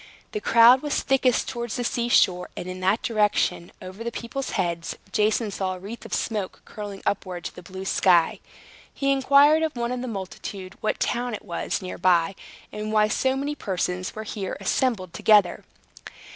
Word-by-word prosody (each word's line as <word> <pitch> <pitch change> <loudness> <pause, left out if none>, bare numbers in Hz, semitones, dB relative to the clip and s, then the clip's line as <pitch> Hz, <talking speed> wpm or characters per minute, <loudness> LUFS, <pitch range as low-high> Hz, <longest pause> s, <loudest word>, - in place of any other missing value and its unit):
The 425 - -3
crowd 235 +3 +6
was 295 -2 -1
thickest 260 -3 +2
towards 240 -3 -4
the 245 - -2
sea 235 0 -1
shore; 180 -6 +3
and - - -5
in 185 0 -6
that 190 +4 +1
direction, 210 -6 +1
over 185 +4 -8
the 235 - -3
people's 255 +4 -5
heads, 170 -3 -2 0.2
Jason 215 +1 +1
saw 190 -1 -2
a - - -10
wreath 205 +6 -9
of - - -8
smoke 210 -4 -3
curling 205 -2 -8
upward 185 -3 -2
to - - -5
the - - -9
blue 190 +1 -8
sky. 175 -3 +3 0.5
He 275 0 0
inquired 280 +3 +5
of 315 -3 -1
one 235 0 -2
of 250 -1 -3
the 255 - -4
multitude 190 -2 -6
what 215 - -1
town 245 -1 -1
it - - -10
was - - -3
near 185 - -6
by, 180 0 +3 0.4
and 210 0 -4
why 215 -1 +3
so 260 +4 +1
many 285 +2 -2
persons 185 -7 -3
were 215 - -5
here 205 -3 -5
assembled 195 -3 0
together. 205 -5 +3
210 Hz, 185 wpm, -25 LUFS, 185-245 Hz, 0.5 s, crowd